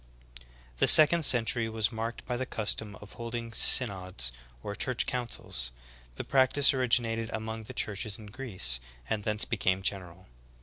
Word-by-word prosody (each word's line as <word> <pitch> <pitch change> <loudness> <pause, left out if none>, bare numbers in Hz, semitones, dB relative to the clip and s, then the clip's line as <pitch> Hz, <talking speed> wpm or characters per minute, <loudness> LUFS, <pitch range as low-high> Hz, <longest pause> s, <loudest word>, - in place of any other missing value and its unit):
6. - - -19
The - - +3
second 155 +1 +9
century 115 -2 +2
was 110 0 -1
marked 115 +1 -6
by 125 - -4
the 130 +1 -4
custom 105 -1 -3
of 105 -1 -14
hold 115 0 -7
ing 115 -1 -6
synods 95 - +1 0.3
or 100 - -5
church 130 +2 -2
councils; 120 - -4 0.5
the - - -6
practice 135 +2 +2
originated 115 -3 0
among 110 0 -6
the - - -10
churches 105 0 -2
in 110 - -13
Greece, 100 - -2 0.3
and 110 -2 -3
thence 105 0 +3
became 95 -5 -2
general. 95 -2 -4
110 Hz, 160 wpm, -28 LUFS, 100-120 Hz, 0.5 s, second